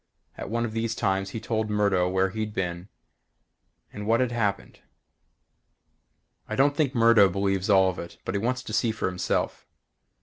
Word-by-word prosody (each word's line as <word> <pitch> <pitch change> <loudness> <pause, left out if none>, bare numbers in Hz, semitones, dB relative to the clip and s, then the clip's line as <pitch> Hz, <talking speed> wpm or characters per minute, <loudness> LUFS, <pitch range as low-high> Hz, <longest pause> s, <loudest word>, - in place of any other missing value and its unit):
At - - -7
one 115 +2 -1
of 115 - -4
these 115 0 -2
times 95 0 0
he 110 - -5
told 110 -1 -2
Murdo 100 -4 +2
where 95 0 +1
he'd 110 0 -4
been 90 0 -3 1.0
and 105 0 -6
what 115 +1 +3
had 125 -2 +1
happened. 115 -4 -2 1.7
I - - -2
don't 140 +2 +3
think 145 -3 0
Murdo 115 -4 +6
believes 95 +1 -1
all 95 -2 +5
of 90 - -10
it 85 - -8
but - - -3
he 100 - 0
wants 125 +4 -1
to - - -7
see 115 - +2
for 110 - -4
himself. 90 -1 -2
105 Hz, 175 wpm, -26 LUFS, 95-115 Hz, 1.7 s, Murdo